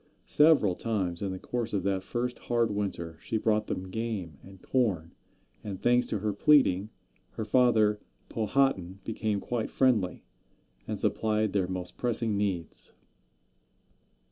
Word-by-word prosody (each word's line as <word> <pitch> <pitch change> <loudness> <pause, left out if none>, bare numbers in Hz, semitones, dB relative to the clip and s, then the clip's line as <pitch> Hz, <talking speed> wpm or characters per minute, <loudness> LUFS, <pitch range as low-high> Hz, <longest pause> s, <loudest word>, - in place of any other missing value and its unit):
Several 150 - +4
times, 95 -5 -2
in 100 -2 -2
the 95 - -4
course 120 +3 -4
of 100 -3 0
that 95 -1 0
first 120 +5 -3
hard 120 -2 0
winter, 85 -5 -4
she 110 - -2
brought 110 -1 +1
them 95 0 -4
game 100 -9 -4
and 95 0 -14
corn, 95 -10 0 0.5
and, 100 -3 -5
thanks 120 0 +3
to - - -1
her 105 +1 -1
pleading, 105 -6 +4 0.4
her 110 - -4
father 110 -3 +3 0.3
Powhatan 105 -5 0
became 110 -2 -2
quite 115 +2 -3
friendly, 110 -9 +1 0.6
and - - -3
supplied 110 -2 0
their 95 -3 +1
most 90 -1 -6
pressing 115 -3 0
needs. 95 -6 -3
105 Hz, 140 wpm, -29 LUFS, 95-115 Hz, 0.6 s, Several